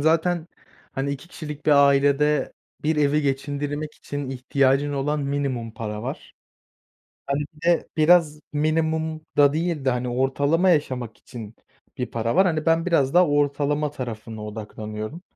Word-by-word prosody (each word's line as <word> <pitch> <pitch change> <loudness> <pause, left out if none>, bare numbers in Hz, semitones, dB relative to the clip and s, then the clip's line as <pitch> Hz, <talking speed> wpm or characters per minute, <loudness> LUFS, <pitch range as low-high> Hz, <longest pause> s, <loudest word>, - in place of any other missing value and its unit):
zaten, 165 +2 +2 0.5
hani, 135 +1 -2
2 140 +5 -6
kişilik 150 -3 -8
bir - - +5 0.2
ailede 140 +2 +2 0.3
bir 155 +1 +1
evi 150 0 +2
geçindirmek 145 +2 -2
için 145 -2 -5
ihtiyacın 135 +2 +1
olan 145 +2 -1
minimum 140 -5 -2
para 105 -1 -5
var. - - -7 0.9
Hani, 140 +1 0
bir 150 - -19
de 175 -1 +3
biraz 155 -1 +4
minimumda 155 -1 +1
değil 160 -3 -1
de, 130 - +3
hani, 125 0 -1
ortalama 140 +8 +2
yaşamak 130 -7 0
için 115 -3 -10 0.4
bir 125 - -1
para 115 +2 -1
var, 190 0 +6
hani, 160 -2 -1
ben 165 +2 +3
biraz 145 -5 +2
daha 180 0 +6
ortalama 145 +1 +1
tarafına 115 -5 -6
odaklanıyorum. 110 - -6
145 Hz, 140 wpm, -24 LUFS, 130-155 Hz, 0.9 s, var